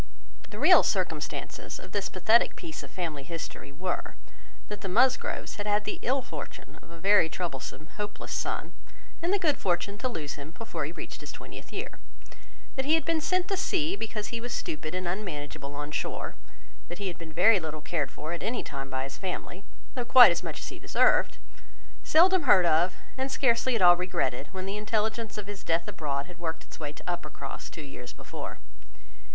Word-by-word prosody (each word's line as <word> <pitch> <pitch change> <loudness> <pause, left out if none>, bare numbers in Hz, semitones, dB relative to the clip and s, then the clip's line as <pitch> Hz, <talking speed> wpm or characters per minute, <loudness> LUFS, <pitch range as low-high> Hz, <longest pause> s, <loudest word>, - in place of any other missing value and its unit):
The - - -8
real - - +8
circumstances - - -2
of - - -11
this 200 -2 -1
pathetic 220 +6 +4
piece 330 -2 -6
of - - -10
family 160 -6 -3
history 165 -1 -6
were, 180 +6 -3 0.5
that 210 -1 -6
the 195 - -3
Musgroves 255 +6 +2
had 205 0 -3
had 210 0 +2
the - - -3
ill 260 +2 +1
fortune - - -8
of - - -17
a 170 - -10
very 195 -2 +5
troublesome, 155 -4 -4
hopeless 210 0 -5
son; - - -2 0.5
and 340 +2 +1
the 405 - +4
good 320 -7 +2
fortune 190 +3 0
to 255 - 0
lose 150 - -4
him 155 +5 -10
before 230 - -3
he - - -4
reached - - -8
his - - -7
twentieth - - -10
year; - - -5 0.8
that 265 -1 -1
he 310 +3 +5
had 325 - 0
been 330 -1 +2
sent 365 +2 +1
to 390 - +2
sea 370 -2 +1
because 215 - -4
he 235 -1 -3
was 245 +1 -5
stupid 155 +2 -3
and 185 -1 -2
unmanageable 150 -7 -4
on 145 +1 -4
shore; - - -2 0.5
that 175 - -6
he 200 - -3
had 175 - -5
been 165 -1 -8
very 190 +6 +6
little 155 -2 -4
cared 150 -2 -1
for 155 +3 -5
at 170 - -4
any 235 +2 -1
time 135 -1 -5
by 130 0 -1
his 135 0 -7
family, 185 0 -4 0.3
though 250 - -1
quite 245 -3 +10
as 170 - 0
much - - -5
as - - -5
he - - -9
deserved; - - +3 0.7
seldom 345 -2 +5
heard 185 -3 +8
of, 170 +2 +4 0.2
and 265 +1 -1
scarcely 250 -1 +3
at 210 - +2
all 175 0 +9
regretted, 170 -7 -1
when 190 -1 -5
the 195 +2 -3
intelligence 215 0 -1
of 210 - -4
his 205 -1 -7
death 165 +1 +1
abroad 140 -3 -2
had 175 -1 -13
worked 165 0 -3
its - - -12
way 150 -2 -3
to 150 - -14
Uppercross, 150 -5 -5
two 160 - -8
years 125 -3 -8
before. - - -7
185 Hz, 200 wpm, -29 LUFS, 160-230 Hz, 0.8 s, quite